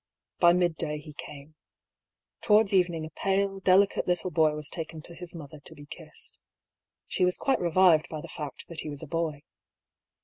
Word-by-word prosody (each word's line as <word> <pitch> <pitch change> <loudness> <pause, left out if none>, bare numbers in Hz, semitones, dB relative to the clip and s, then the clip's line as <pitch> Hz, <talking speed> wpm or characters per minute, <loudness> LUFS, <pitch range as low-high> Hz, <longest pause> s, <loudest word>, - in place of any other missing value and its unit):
By 170 -1 +7
midday 170 -4 0
he 150 0 -11
came. 145 +1 -10 0.9
To 210 - +3
wards 210 -1 +5
evening 175 -4 +2
a 160 - -9
pale, 195 0 0
delicate 195 +1 +3
little 180 0 0
boy 155 -3 +3
was 150 -1 -6
taken 160 -2 -6
to 170 - -8
his 175 0 -9
mother 155 -2 -9
to - - -10
be 145 - -12
kissed. - - -9 0.7
She - - -1
was 180 0 +2
quite 270 - +1
revived 175 -1 +4
by 155 - -5
the - - -9
fact 150 -3 -7
that 165 -2 -7
he 155 - -4
was 145 +1 -7
a - - -7
boy. 155 -2 -2
165 Hz, 190 wpm, -28 LUFS, 150-180 Hz, 0.9 s, By